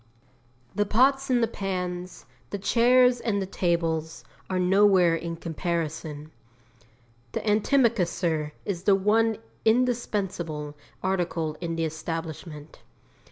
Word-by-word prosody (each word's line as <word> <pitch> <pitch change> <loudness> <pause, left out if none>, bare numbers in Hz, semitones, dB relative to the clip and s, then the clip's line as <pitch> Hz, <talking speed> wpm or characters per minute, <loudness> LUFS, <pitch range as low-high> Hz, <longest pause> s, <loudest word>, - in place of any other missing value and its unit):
The 205 0 0
pots 270 +5 +3
and 245 -2 +3
the - - +3
pans, 180 -3 -4 0.2
the 200 - -3
chairs 245 +4 +4
and 205 -3 0
the 195 - -2
tables, 165 -3 -1 0.3
are 185 - -1
nowhere 185 -2 +4
in 165 0 -4
comparison. 160 -2 -4 1.0
The - - -2
antimacassar 185 - +1
is 185 -3 -4
the 200 - +6
one 220 +3 +2 0.3
indispensable 200 -11 0 0.3
article 175 -4 -1
in 165 -1 -3
the 165 0 0
establishment. 160 -1 -6
180 Hz, 110 wpm, -26 LUFS, 165-210 Hz, 1.0 s, the